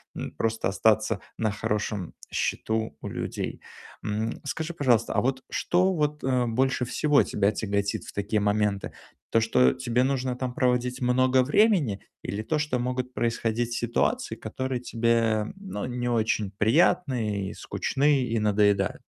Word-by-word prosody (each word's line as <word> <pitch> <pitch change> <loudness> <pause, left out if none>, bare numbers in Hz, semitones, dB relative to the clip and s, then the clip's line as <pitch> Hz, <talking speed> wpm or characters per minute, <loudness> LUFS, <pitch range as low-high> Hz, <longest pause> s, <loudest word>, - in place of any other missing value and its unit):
м, - - -5
просто 115 -2 0
остаться 110 +2 +2 0.2
на 110 -2 0
хорошем 105 -3 -2 0.2
счету 110 -8 -1
у - - -5
людей. - - -4 0.5
М, 110 +2 -2
скажи, 160 +4 -3
пожалуйста, 125 -8 +2
а - - +2
вот 130 +1 -1
что 185 +2 +2
вот, 150 -2 -1
э, 130 -2 +2
больше 130 +2 +1
всего 145 +3 +3
тебя 100 0 +1
тяготит 100 -1 -1
в - - -10
такие 105 +1 0
моменты? 105 -1 0 0.4
То, 115 - +4
что 125 +3 +4
тебе 125 -1 0
нужно 130 -2 0
там 125 -1 -3
проводить 125 0 0
много 130 +1 +3
времени, 150 - +3 0.2
или 105 +2 -4
то, 155 +5 0
что 150 -4 0
могут 125 +1 -2
происходить 115 0 -1
ситуации, 215 - 0
которые 130 -1 -4
тебе, 115 -3 +1
ну, 190 - -5
не 120 0 -3
очень 110 -3 0
приятны 110 - +2
и - - -7
скучны, 140 0 +1
и 115 -2 -1
надоедают? 100 -2 +2
120 Hz, 150 wpm, -26 LUFS, 110-130 Hz, 0.5 s, То